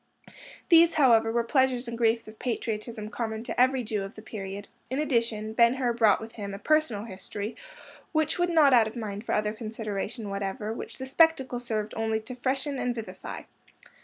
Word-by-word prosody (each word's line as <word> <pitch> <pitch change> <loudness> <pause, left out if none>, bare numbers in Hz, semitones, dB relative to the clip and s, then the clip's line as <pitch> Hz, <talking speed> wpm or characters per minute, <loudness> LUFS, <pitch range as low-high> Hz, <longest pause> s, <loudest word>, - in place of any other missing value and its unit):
These, 335 -1 +7
however, 230 -6 +5
were 235 0 +1
pleasures 260 0 +1
and 235 - -4
griefs 230 -1 +1
of 215 0 -12
patriotism 225 -2 -3
common 220 -2 -3
to 245 - -1
every 260 0 +3
Jew 215 -2 -2
of 195 +2 -7
the 215 - -11
period; 200 -2 -6 0.2
in 260 - -2
addition, 230 -7 0
Ben 235 +2 +5
Hur 250 -3 0
brought 220 -4 +4
with 225 +1 -8
him 200 -3 -6
a - - -6
personal 305 -4 +1
history 205 +1 -6 0.6
which 315 +1 +1
would 350 0 +2
not 310 -5 +5
out 230 -3 +6
of 220 - -8
mind 210 -3 -5
for - - -2
other 210 0 0
consideration 215 -1 -5
whatever, 200 +3 -3
which - - -7
the 260 - -5
spectacle 265 -3 +3
served 220 -3 -3
only 220 0 0
to 225 +4 -9
freshen 265 +2 -1
and 245 -1 -1
vivify. 225 -2 -7
230 Hz, 190 wpm, -27 LUFS, 215-255 Hz, 0.6 s, These